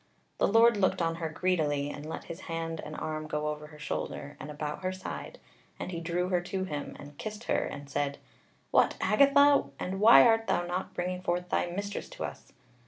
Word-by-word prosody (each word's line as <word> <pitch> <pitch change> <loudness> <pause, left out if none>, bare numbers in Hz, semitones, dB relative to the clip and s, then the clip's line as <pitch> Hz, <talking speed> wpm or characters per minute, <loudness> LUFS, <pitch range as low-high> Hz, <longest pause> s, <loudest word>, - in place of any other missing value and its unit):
The - - +4
Lord 225 +1 +6
looked 190 -1 +2
on 165 -1 0
her 165 -1 -3
greedily, 150 -4 0
and 145 +1 -8
let - - -5
his 170 +1 -8
hand 165 -1 -3
and 155 - -7
arm 155 0 -4
go 150 0 -1
over 150 0 -5
her 150 0 -14
shoulder, 145 0 -4
and - - -7
about 150 +1 -4
her 185 0 -1
side, 185 0 -7 0.4
and - - -4
he 170 -2 -4
drew 175 +2 -1
her 180 -2 +2
to 190 +1 -3
him, 150 -6 -5
and 145 0 -12
kissed 215 +1 -6
her, - - +1
and 140 0 -7
said: 140 0 -1 0.5
"What, - - +4
Agatha! 280 +6 +5
and 190 +1 -3
why 225 +3 +9
art 225 -1 +4
thou 175 - +1
not 180 +2 -4
bringing 180 +1 -2
forth 180 0 -1
thy - - +1
mistress 200 +3 -4
to - - -6
us?" - - -7
175 Hz, 205 wpm, -30 LUFS, 150-190 Hz, 0.5 s, why